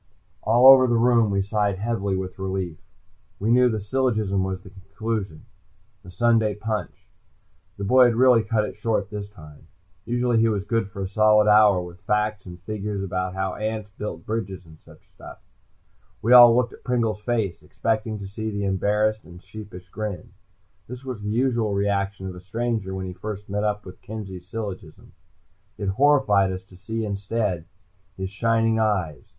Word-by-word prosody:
All 120 +3 +3
over 130 -1 +9
the 120 -1 +2
room 115 -2 +4
we 100 -1 +1
sighed 100 -1 0
heavily 100 -2 -1
with 95 0 -6
relief. 95 -3 -3 0.6
We 110 +3 0
knew 125 +1 +5
the 110 -2 -2
syllogism 105 -3 0
was 95 -1 -3
the 95 - -13
conclusion, 100 -2 -5 0.6
the 90 - -14
Sunday 110 +2 +2
punch. 110 +1 -5 0.7
The 100 - -5
boy 125 +5 +6
had 120 -2 +2
really 125 -1 +5
cut 110 0 0
it - - -7
short 105 -1 -1
this 100 -1 -6
time. 75 -6 -15 0.4
Usually 120 0 +1
he 115 0 +3
was 100 -3 -1
good 115 -1 -1
for 100 -1 -6
a - - -3
solid 105 +1 +4
hour 105 -3 +5
with 90 0 -11
facts 105 -2 -1
and 90 0 -10
figures 105 -1 -4
about 95 -1 -3
how 95 -1 -2
ants 110 -1 -4
built 95 -6 -6
bridges 100 -5 -4
and 80 -1 -16
such - - -19
stuff. - - -12 0.9
We 120 +3 +4
all 120 -2 +10
looked 125 -1 +1
at - - -16
Pringle's 115 -4 -1
face, 110 -6 -2
expecting 110 -1 -2
to 100 -1 -7
see 110 +3 -5
the 100 -1 -3
embarrassed 105 +3 0
and 90 0 -13
sheepish 95 -2 -11
grin. 105 -5 -6 0.6
This 125 +2 -9
was 125 -5 -5
the 105 - -4
usual 115 -3 0
reaction 100 -1 -1
of 95 - -5
a 90 - -10
stranger 110 0 -3
when 95 0 -4
he 90 - -6
first 105 +1 -7
met 105 +1 -1
up 105 -1 -1
with 90 -1 -12
Kenzie's 95 -5 -8
syllogism. 100 -5 -7 0.6
It 100 - -2
horrified 105 -5 +3
us 95 0 -6
to 95 -1 -18
see, 110 +4 -4
instead, 100 -3 -2 0.5
his 95 0 -4
shining 115 +1 +1
eyes. 95 -9 -1
105 Hz, 180 wpm, -24 LUFS, 95-115 Hz, 0.9 s, all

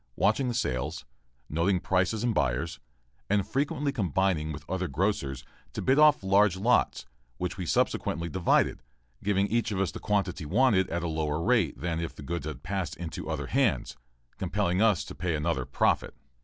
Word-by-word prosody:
watching 110 +6 +2
the 120 - -1
sales, 65 - -2 0.4
noting 85 +4 +1
prices 95 +5 0
and 120 -2 +1
buyers, 70 - -1 0.5
and 100 -1 +2
frequently 140 +3 0
combining 95 - 0
with 75 - -8
other 95 -1 -2
grocers 70 -5 -1 0.3
to - - -4
bid 130 +3 +3
off 150 -6 +6
large 95 -1 +4
lots, 120 +6 +2 0.3
which 90 0 -3
we 90 -3 -5
subsequently 85 +2 0
divided, 90 -5 +1 0.4
giving 100 -1 +2
each 115 +2 0
of 95 - -2
us 95 - 0
the - - -7
quantity 100 -5 -1
wanted 95 - +3
at 85 +1 -2
a - - -1
lower 80 -1 -1
rate 105 - +1
than 85 +2 -2
if 85 0 -4
the - - -10
goods 80 0 -4
had 70 -4 -7
passed 95 -2 -3
into 85 -2 -6
other - - -2
hands, - - +1 0.4
compelling 90 +3 0
us 110 -6 +3
to - - -8
pay 90 -3 -2
another 75 -4 -1
profit. 65 - +1
90 Hz, 175 wpm, -28 LUFS, 80-105 Hz, 0.5 s, off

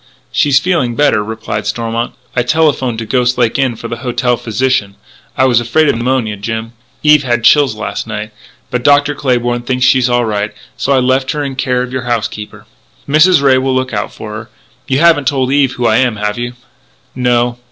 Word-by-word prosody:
"She's 140 -2 +3
feeling 140 -7 0
better," 145 -7 +2
replied 110 -1 -5
Stormont. 115 +2 -3 0.2
"I 125 - +2
telephoned 130 -3 +1
to 115 - -4
Ghost 125 +1 +1
Lake 120 +1 +1
Inn 130 -3 +1
for 115 - -7
the 115 - -5
hotel 125 0 0
physician.... 115 -3 -1 0.4
I 130 - +4
was 125 -3 +3
afraid 145 +6 +2
of - - +1
pneumonia, 120 -3 -1
Jim. 115 +2 -5 0.3
Eve 150 -1 +5
had 120 -3 -1
chills 145 +4 +4
last - - -5
night.... - - -5 0.4
But 125 - -1
Dr. 145 +1 +4
Claybourn 120 -3 -1
thinks 125 -1 +1
she's 130 -1 +3
all 120 0 +2
right.... 105 -1 -2 0.2
So 140 - -2
I 135 - +4
left 130 +1 +1
her 150 -1 -2
in 135 -2 -4
care 125 -1 0
of 125 0 -7
your 130 - -2
housekeeper." 110 -2 -4 0.4
"Mrs. 155 +2 +4
Ray 130 -2 +4
will 130 0 0
look 130 -2 -2
out 105 - -2
for 105 - -9
her.... 110 +1 -8 0.4
You 135 - +1
haven't 160 -3 +4
told 130 -2 0
Eve 140 -2 +2
who 120 - -3
I 110 - +3
am, 125 -3 +1
have 105 +1 -3
you?" 120 0 -4 0.6
"No." 120 -1 0
125 Hz, 200 wpm, -14 LUFS, 115-135 Hz, 0.6 s, Eve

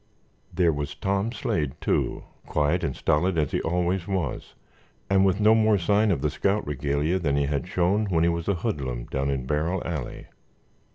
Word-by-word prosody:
There 85 -3 +2
was 75 0 -4
Tom 100 +3 -1
Slade, 80 - -2
too, - - -1 0.2
quiet 75 +4 +1
and 65 - -2
stolid 85 +3 +1
as 75 -3 +1
he - - 0
always 90 +2 -1
was 95 -8 -3 0.6
and 95 0 +5
with 95 0 +2
no 110 +1 +6
more 110 -1 +4
sign 105 +4 +2
of 85 -8 0
the 75 - +1
scout 100 +7 0
regalia 75 +5 -1
than 75 -5 0
he 70 - +2
had 70 +3 -2
shown 95 +4 +1
when 85 -4 +2
he 85 - +4
was 85 -1 -4
a 100 - +2
hoodlum 70 - -3
down 70 +2 -2
in 65 -2 -2
Barrel 80 +6 -1
Alley. 75 -7 -5
85 Hz, 185 wpm, -25 LUFS, 75-95 Hz, 0.6 s, no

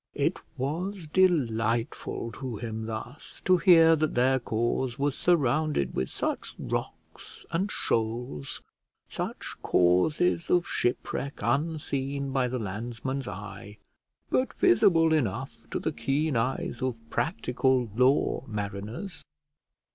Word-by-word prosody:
It - - 0 0.2
was 170 +7 -3
delightful 115 -10 +1
to 130 -3 -5
him 110 0 -5
thus 115 +6 -7
to 185 0 +5
hear 165 -3 +7
that 155 0 0
their 130 +2 +3
cause 120 +2 -1
was 145 0 +1
surrounded 150 - +1
with 65 - -1
such - - -3
rocks - - -6
and 190 +5 0
shoals; 110 - -2 0.5
such - - -4
causes 150 - +2
of 175 -1 +3
shipwreck 140 +3 -1
unseen 140 -2 -1
by 130 -2 +1
the 125 +1 -2
landsman's 120 +5 -4
eye, 100 +1 -8 0.5
but 255 - +1
visible 175 - +5
enough 130 -2 -1
to - - -2
the 160 - -1
keen 145 0 0
eyes 120 +3 -1
of 130 -2 0 0.2
practical 130 -6 +1
law 130 +1 +3
mariners. 105 - -5
130 Hz, 115 wpm, -28 LUFS, 115-160 Hz, 0.5 s, hear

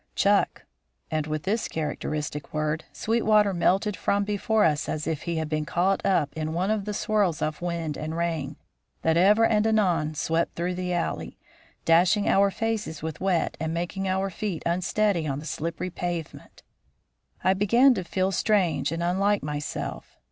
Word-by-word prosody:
"Chuck." - - +2 0.5
And 155 -1 -1
with 155 -1 -3
this 215 +4 0
characteristic 150 -1 -4
word 155 +1 -1
Sweetwater 215 -3 +2
melted 190 +4 +1
from 200 +2 +1
before 210 +2 +1
us 155 -1 +1
as 155 - -2
if 160 -2 -2
he 170 - -3
had 160 -1 -1
been 155 0 -1
caught 180 +5 0
up 155 -7 +1
in 155 0 -3
one 185 +5 0
of 210 -2 -1
the 210 - -3
swirls 205 -7 +1
of 155 +1 -2
wind 170 -3 -3
and 155 +2 -4
rain 160 -4 -2 0.5
that 160 0 +3
ever 205 +6 +5
and 215 -1 +2
anon 180 -8 +1
swept 165 +3 0
through 175 +2 -1
the 180 0 -3
alley, 175 -1 -2 0.5
dashing 180 +5 +4
our 200 +1 +4
faces 215 -7 -3
with 160 0 -5
wet 185 -4 +1
and 160 +1 -2
making 185 +3 -3
our 190 +1 0
feet 190 -4 -4
unsteady 180 0 +1
on 135 -1 -2
the 150 - -7
slippery 165 +4 -4
pavement. 175 -2 -6 0.8
I 190 - +4
began 235 +7 +5
to 185 - -3
feel 185 +2 0
strange 180 -7 +1
and 165 +1 -2
unlike 195 +4 +1
myself. 150 0 -5
175 Hz, 170 wpm, -26 LUFS, 160-200 Hz, 0.8 s, ever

